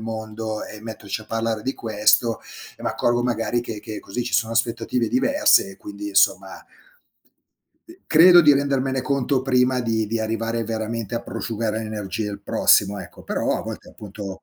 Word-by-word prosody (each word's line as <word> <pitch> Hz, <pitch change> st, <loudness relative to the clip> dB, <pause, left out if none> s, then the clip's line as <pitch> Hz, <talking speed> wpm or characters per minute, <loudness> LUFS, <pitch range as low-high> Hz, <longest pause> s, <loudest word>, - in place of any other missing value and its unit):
mondo 110 Hz, -1 st, -5 dB
e 105 Hz, -, -10 dB
metterci 110 Hz, -1 st, -6 dB
a -, -, -12 dB
parlare 115 Hz, -1 st, -2 dB
di 135 Hz, +3 st, -2 dB
questo. 110 Hz, +1 st, +2 dB, 0.4 s
E -, -, -12 dB
m'accorgo 120 Hz, 0 st, 0 dB
magari 120 Hz, 0 st, 0 dB
che 115 Hz, -3 st, -6 dB
che 110 Hz, 0 st, -7 dB
così 120 Hz, +5 st, -4 dB
ci 125 Hz, -, -5 dB
sono 115 Hz, 0 st, +1 dB
aspettative 115 Hz, +1 st, 0 dB
diverse 280 Hz, -3 st, +3 dB
e 190 Hz, -, -12 dB
quindi 310 Hz, +3 st, -8 dB
insomma 320 Hz, -, +1 dB, 1.2 s
uhm, 335 Hz, -, -13 dB
credo 175 Hz, +2 st, +8 dB
di 150 Hz, -3 st, +6 dB
rendermene 135 Hz, -1 st, 0 dB
conto 135 Hz, -1 st, 0 dB
prima 125 Hz, -1 st, +2 dB
di 110 Hz, -2 st, 0 dB
di 115 Hz, +2 st, -2 dB
arrivare 115 Hz, +1 st, -2 dB
veramente 115 Hz, 0 st, -4 dB
a 115 Hz, -, -2 dB
prosciugare 110 Hz, -1 st, -3 dB
l'energia 110 Hz, -1 st, -4 dB
il 100 Hz, 0 st, -7 dB
prossimo, 100 Hz, 0 st, +3 dB
ecco. -, -, -11 dB
Però, -, -, -1 dB
a -, -, -5 dB
volte -, -, -8 dB
appunto, 100 Hz, -2 st, -9 dB
115 Hz, 165 wpm, -22 LUFS, 110-130 Hz, 1.2 s, credo